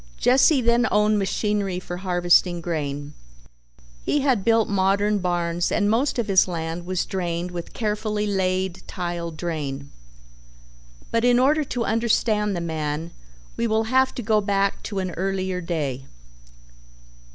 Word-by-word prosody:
Jesse 260 Hz, +2 st, +4 dB
then 235 Hz, +1 st, +3 dB
owned 210 Hz, 0 st, +3 dB
machinery 200 Hz, -1 st, -1 dB
for 175 Hz, -1 st, -6 dB
harvesting 175 Hz, -1 st, +2 dB
grain. 145 Hz, -4 st, -4 dB, 0.9 s
He 295 Hz, -, 0 dB
had 260 Hz, -8 st, +2 dB
built 225 Hz, 0 st, +3 dB
modern 200 Hz, +1 st, +1 dB
barns 175 Hz, -1 st, -1 dB
and 205 Hz, -1 st, +2 dB
most 255 Hz, +6 st, +1 dB
of 235 Hz, -, 0 dB
his 190 Hz, -2 st, +4 dB
land 170 Hz, 0 st, -4 dB
was 185 Hz, -1 st, -1 dB
drained 175 Hz, -2 st, -3 dB
with 175 Hz, -1 st, -7 dB
carefully 210 Hz, -1 st, -1 dB
laid 190 Hz, -2 st, -1 dB
tile 175 Hz, -2 st, -4 dB
drain, 150 Hz, -4 st, -5 dB, 1.2 s
but 230 Hz, 0 st, +1 dB
in 245 Hz, 0 st, +4 dB
order 295 Hz, +5 st, +3 dB
to 245 Hz, -3 st, -2 dB
understand 215 Hz, -2 st, +1 dB
the 170 Hz, -, -3 dB
man 160 Hz, 0 st, -3 dB, 0.4 s
we 235 Hz, -, 0 dB
will 220 Hz, 0 st, +1 dB
have 260 Hz, 0 st, +3 dB
to 245 Hz, -, -4 dB
go 215 Hz, 0 st, +2 dB
back 200 Hz, -1 st, 0 dB
to 200 Hz, -, -5 dB
an 185 Hz, -1 st, -2 dB
earlier 190 Hz, 0 st, -2 dB
day. 145 Hz, -6 st, -3 dB
190 Hz, 140 wpm, -23 LUFS, 175-215 Hz, 1.2 s, Jesse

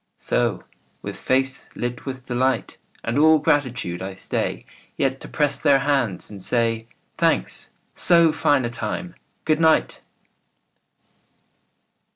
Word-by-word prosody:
So, -, -, -1 dB, 0.4 s
with -, -, -5 dB
face 130 Hz, 0 st, +1 dB
lit 120 Hz, +2 st, -5 dB
with 130 Hz, -1 st, -6 dB
delight 130 Hz, -1 st, -1 dB, 0.3 s
And 115 Hz, +4 st, -1 dB
all 160 Hz, +1 st, +6 dB
gratitude, 125 Hz, -, -1 dB
I 95 Hz, 0 st, -6 dB
stay 95 Hz, -, -2 dB, 0.3 s
Yet 135 Hz, -1 st, 0 dB
to -, -, -10 dB
press 145 Hz, -2 st, 0 dB
their 140 Hz, -1 st, +4 dB
hands 135 Hz, -11 st, 0 dB
and 100 Hz, -2 st, -7 dB
say, 115 Hz, +1 st, +1 dB, 0.3 s
"Thanks. 60 Hz, -, +1 dB, 0.2 s
So 170 Hz, -2 st, +5 dB
fine 145 Hz, -4 st, +1 dB
a 120 Hz, -, -3 dB
time! 120 Hz, +10 st, -5 dB, 0.3 s
Good 155 Hz, 0 st, +2 dB
night. 160 Hz, -1 st, +2 dB
130 Hz, 125 wpm, -22 LUFS, 115-145 Hz, 0.4 s, all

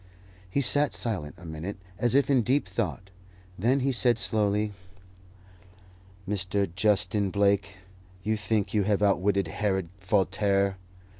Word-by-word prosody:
He 140 Hz, -, 0 dB
sat 145 Hz, +2 st, +1 dB
silent 95 Hz, -, -4 dB
a 85 Hz, -, -13 dB
minute, 80 Hz, +5 st, -6 dB, 0.2 s
as 120 Hz, +1 st, +2 dB
if 140 Hz, -1 st, +4 dB
in 135 Hz, -3 st, +3 dB
deep 130 Hz, +1 st, +1 dB
thought; 95 Hz, 0 st, -4 dB, 0.4 s
then 125 Hz, +9 st, +1 dB
he 135 Hz, +1 st, +1 dB
said 120 Hz, -1 st, +3 dB
slowly, 105 Hz, -2 st, +2 dB, 1.5 s
"Mr. 100 Hz, 0 st, 0 dB
Justin 100 Hz, 0 st, +1 dB
Blake, 100 Hz, 0 st, +1 dB, 0.5 s
you 110 Hz, +1 st, 0 dB
think 105 Hz, -1 st, -1 dB
you 105 Hz, -, +3 dB
have 105 Hz, +1 st, +1 dB
outwitted 100 Hz, -1 st, +2 dB
Herod 95 Hz, -2 st, -1 dB
Voltaire! 100 Hz, 0 st, +1 dB
100 Hz, 130 wpm, -27 LUFS, 95-110 Hz, 1.5 s, if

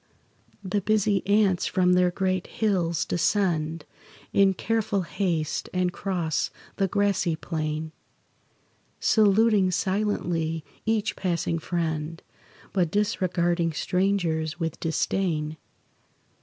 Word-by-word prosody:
The 200 Hz, +2 st, -1 dB
busy 210 Hz, -1 st, +2 dB
ants 200 Hz, -3 st, +3 dB
from 180 Hz, -1 st, +3 dB
their 180 Hz, 0 st, +4 dB
great 185 Hz, 0 st, -1 dB
hills 180 Hz, -7 st, 0 dB
descend 165 Hz, -3 st, 0 dB, 0.5 s
In 195 Hz, -1 st, +4 dB
careful 220 Hz, -2 st, 0 dB
haste, 165 Hz, -3 st, -2 dB
and 180 Hz, -1 st, +1 dB
cross 175 Hz, -6 st, -1 dB, 0.3 s
the 195 Hz, -, +2 dB
grassy 200 Hz, -4 st, +1 dB
plain, 155 Hz, -1 st, -3 dB, 1.1 s
Saluting 210 Hz, -2 st, +4 dB
silently 175 Hz, -4 st, -1 dB, 0.2 s
each 220 Hz, -1 st, +1 dB
passing 170 Hz, -2 st, -1 dB
friend, 160 Hz, -1 st, -3 dB, 0.5 s
But 180 Hz, -4 st, +2 dB
disregarding 175 Hz, -4 st, 0 dB
strangers 170 Hz, -3 st, 0 dB
with 165 Hz, -2 st, -3 dB
disdain. 160 Hz, -2 st, -1 dB
180 Hz, 95 wpm, -26 LUFS, 165-200 Hz, 1.1 s, their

